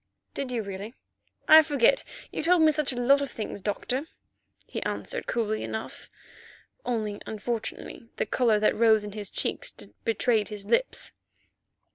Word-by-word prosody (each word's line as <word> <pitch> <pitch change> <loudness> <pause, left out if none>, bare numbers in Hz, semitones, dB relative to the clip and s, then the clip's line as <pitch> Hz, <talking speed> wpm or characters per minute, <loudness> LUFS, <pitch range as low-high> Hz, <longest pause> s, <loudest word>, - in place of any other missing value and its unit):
"Did 270 -2 -3
you? 235 -3 -1
Really, 200 +4 -7 0.5
I 315 +1 +10
forget; 290 - +3 0.3
you - - -3
told 340 +1 +4
me 310 - +6
such 300 -2 +1
a 245 - -3
lot 275 +3 +5
of 280 - -2
things, 215 -4 -5
Doctor," 250 +8 -2 0.6
he - - -5
answered - - -3
coolly 215 -2 -1
enough, 220 - -6 0.7
only 215 -4 -2
unfortunately 230 +1 -5
the - - -1
colour 230 -4 +2
that 215 - +3
rose 220 -2 +4
in 210 - -6
his 205 -1 -5
cheeks - - -1 0.3
betrayed 225 -1 +1
his 205 -2 -7
lips. - - 0
230 Hz, 150 wpm, -27 LUFS, 210-275 Hz, 0.7 s, I